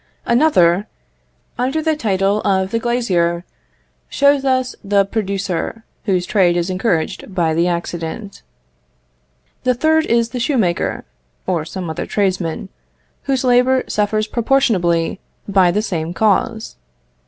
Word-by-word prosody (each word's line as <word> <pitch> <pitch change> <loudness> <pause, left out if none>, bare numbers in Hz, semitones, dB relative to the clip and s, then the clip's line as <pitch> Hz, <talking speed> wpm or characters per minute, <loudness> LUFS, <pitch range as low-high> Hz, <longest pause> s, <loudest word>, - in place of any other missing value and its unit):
Another, 210 - +3 0.7
under 260 +5 0
the 315 0 +1
title 200 -5 0
of 190 -1 0
the 230 - 0
glazier, 185 -8 0 0.6
shows 280 0 +3
us 260 -1 0
the 200 0 +2
producer, 195 0 -3 0.2
whose 185 -4 +1
trade 180 -4 +2
is 175 +2 -1
encouraged 185 -1 -2
by 165 -3 +1
the 170 +2 +2
accident. 175 +4 -4 1.2
The 250 0 +1
third 315 +4 +2
is 235 0 +2
the 250 - -5
shoemaker 230 - 0 0.4
(or 170 -4 -1
some 180 +1 -6
other 160 - -4
tradesman), 190 -3 -1 0.6
whose 265 -1 +1
labour 255 +1 +3
suffers 215 +1 0
proportionably 210 -9 +1 0.3
by 190 -3 +4
the 210 +4 0
same 170 -4 -3
cause. 220 +1 0
200 Hz, 120 wpm, -18 LUFS, 175-240 Hz, 1.2 s, by